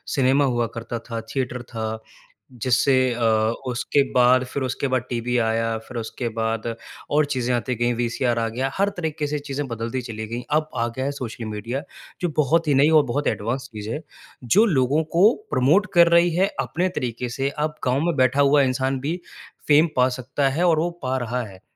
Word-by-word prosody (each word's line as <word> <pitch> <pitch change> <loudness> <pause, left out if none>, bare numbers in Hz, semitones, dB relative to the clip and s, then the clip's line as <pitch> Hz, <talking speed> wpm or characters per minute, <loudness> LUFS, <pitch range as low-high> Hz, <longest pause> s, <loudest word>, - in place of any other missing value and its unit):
Cinema 135 +1 +3
हुआ 120 -3 0
करता 115 +1 -4
था। 115 -1 -3
थिएटर 125 -2 -2
था। 110 -2 -4 0.7
जिससे 130 +2 +3 0.2
अ, 120 - -5 0.5
उसके 125 +3 +1
बाद 125 +1 +5
फिर 130 +2 -4
उसके 130 +2 -2
बाद 130 -2 0
टीवी 125 0 -1
आया, 115 0 0
फिर 130 - -7
उसके 115 +2 -4
बाद 115 0 -2 0.4
और 150 +1 +3
चीज़ें 125 -1 -1
आती 125 +1 -2
गई 120 +1 +1
वीसीआर 120 0 0
आ 115 - 0
गया। 130 +4 -2
हर 200 +1 +2
तरीके 160 -3 -2
से 150 0 -2
चीज़ें 145 0 -4
बदलती 115 +1 -3
चली 110 -2 -6
गईं। 120 +2 -5
अब 155 0 -2
आ 115 0 +1
गया 130 - -1
है 140 - 0
सोशल 120 -4 -6
मीडिया 110 +5 -4 0.4
जो 175 - 0
बहुत 160 +3 +2
ही - - +4
नई 140 +3 +5
और - - -4
बहुत 145 +1 -1
एडवांस 120 +5 -2
चीज़ 105 0 -6
है। 150 - -3 0.5
जो 215 +3 +7
लोगों 145 - +2
को 205 +7 +7 0.2
प्रमोट 160 +12 +3
कर 170 -1 +7
रही 175 +1 +4
है 190 +3 +3
अपने 165 +9 -1
तरीके 125 0 -3
से 135 +1 +1 0.2
अब 155 - -5
गाँव 130 +2 +1
में 170 -2 +1
बैठा 130 +2 +3
हुआ 140 +1 +5
इंसान 130 0 0
भी 155 +7 -3 0.5
फ़ेम 155 +3 +6
पा 125 +1 +4
सकता 135 +2 0
है 150 +6 -1
और 160 -2 +3
वो 170 +2 +1
पा 130 0 0
रहा 125 0 -2
है। 95 -4 -12
130 Hz, 200 wpm, -23 LUFS, 120-145 Hz, 0.7 s, जो